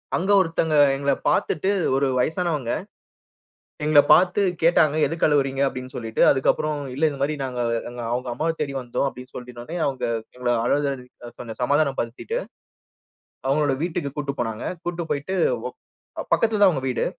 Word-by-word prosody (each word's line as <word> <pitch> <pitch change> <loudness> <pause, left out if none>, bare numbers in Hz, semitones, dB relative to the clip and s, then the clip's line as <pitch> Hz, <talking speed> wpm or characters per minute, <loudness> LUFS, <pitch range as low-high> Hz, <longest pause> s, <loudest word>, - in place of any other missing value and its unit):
அங்கே 190 +3 0
ஒருத்தவங்க 165 -2 0 0.2
எங்கள 140 0 0 0.2
பார்த்துட்டு 190 +5 0 0.3
ஒரு 135 +1 +2
வயசானவங்க. 155 -4 -1 1.1
எங்களை 150 -1 +6
பார்த்து 185 +3 +4 0.2
கேட்டாங்க 155 -2 +4
"எதுக்கு 165 0 -1
அழுவுறீங்க?" 140 -2 +1
அப்படின்னு 130 -1 -5
சொல்லிட்டு. 115 -2 -4
அதுக்கப்புறம் 150 +3 +1 0.2
இல்ல, 140 - -6
இந்த 140 - -7
மாதிரி 150 +2 +1
நாங்க 125 -2 -4 0.3
எங்க 120 0 -7
அவங்க 125 +1 -2
அம்மாவை 160 +7 -1
தேடி 145 -2 -1
வந்தோம். 125 +2 -2
அப்படின்னு 125 -1 -11
சொல்லி 125 0 -8
உடனே 120 +9 -7
அவங்க 135 -2 -2 0.3
எங்களை 125 -1 0
அழுத 140 +3 +1 0.5
கொஞ்சம் 115 -2 -8
சமாதானம் 140 +1 +2
படுத்திட்டு, 125 - -4 1.1
அவங்களுடைய 140 0 +1
வீட்டுக்கு 170 -4 -2
கூட்டிட்டு 140 -2 -4
போனாங்க. 115 -1 -4 0.2
கூட்டிட்டு 175 -2 -4
போய்ட்டு, 150 +7 -2 0.3
ஒக் - - -19 0.4
அ - - -2
பக்கத்தில 225 -2 +2
தான் 200 - +8
அவங்க 140 -7 -2
வீடு. 125 - 0
140 Hz, 155 wpm, -23 LUFS, 125-160 Hz, 1.1 s, தான்